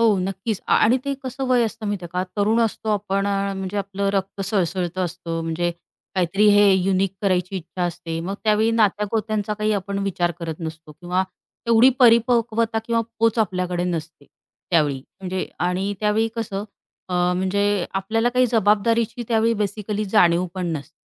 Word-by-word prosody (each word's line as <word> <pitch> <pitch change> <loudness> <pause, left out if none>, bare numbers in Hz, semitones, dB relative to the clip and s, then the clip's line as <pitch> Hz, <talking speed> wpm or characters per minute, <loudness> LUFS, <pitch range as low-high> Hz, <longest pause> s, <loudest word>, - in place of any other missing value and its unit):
हो, 225 -3 +4
नक्कीच 190 +3 -2
अ, - - +1
आणि 230 +4 +5
ते 280 - -1
कसं 260 +1 -4
वय 250 -2 +3
असतं 225 -1 -5
माहिती 205 -3 -3
आहे - - -6
का 180 0 0
तरुण 215 +3 +2
असतो 225 -1 -1
आपण, 200 -1 0
म्हणजे 195 -1 -2
आपलं 200 0 -2
रक्त 195 0 -2
सळसळतं 185 -2 -1
असतं, 170 -1 -4
म्हणजे 165 +1 -1 0.4
काहीतरी 195 +3 +2
हे 205 -1 +6
युनिक 190 0 +1
करायची 185 -1 0
इच्छा 180 +1 -5
असते. 170 -1 -3
मग 185 +4 -3
त्यावेळी 215 +1 +3
नात्या-गोत्यांचा 210 -1 0
काही 215 0 0
आपण 200 0 -2
विचार 175 -3 0
करत 165 -2 -4
नसतो 160 -1 -7
किंवा 180 +4 -1 0.5
एवढी 230 +2 +7
परिपक्वता 230 -1 +3
किंवा 230 0 +1 0.2
पोच 230 0 +2
आपल्याकडे 180 -4 0
नसते 165 -4 -4 0.5
त्यावेळी. 150 -6 +2 0.2
म्हणजे 185 0 -3 0.2
आणि 190 +3 -1
त्यावेळी 215 +1 +2
कसं 205 -3 -3 0.4
अ, 180 - -3 0.2
म्हणजे 200 0 +1
आपल्याला 220 +5 +1
काही 250 0 +4
जबाबदारीची 225 +2 +2
त्यावेळी 230 0 +2
बेसिकली 210 0 -2
जाणीव 180 -4 +3
पण 185 -2 -3
नसते. 145 +2 -10
200 Hz, 160 wpm, -22 LUFS, 180-220 Hz, 0.5 s, एवढी